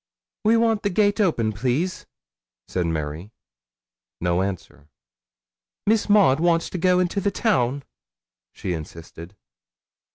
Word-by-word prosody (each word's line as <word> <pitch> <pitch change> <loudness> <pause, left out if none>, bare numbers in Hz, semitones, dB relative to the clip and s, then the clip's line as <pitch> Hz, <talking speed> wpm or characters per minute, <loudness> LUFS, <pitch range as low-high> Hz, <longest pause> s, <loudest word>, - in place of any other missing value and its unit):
'We 225 +2 +5
want 225 -2 +2
the 205 - 0
gate 205 +2 +2
open, 115 - +1
please,' 130 - -2 0.6
said 90 -2 -1
Mary. 80 +3 -4 0.9
No 85 +1 +1
answer. 90 -6 -6 1.0
'Miss 215 0 +2
Maud 195 -10 +5
wants 165 0 +1
to 180 - -4
go 180 +1 +3
into 185 +2 0
the 200 - +1
town,' 140 - 0 0.7
she 90 - -4
insisted. 85 +2 -9
145 Hz, 120 wpm, -23 LUFS, -, 1.0 s, We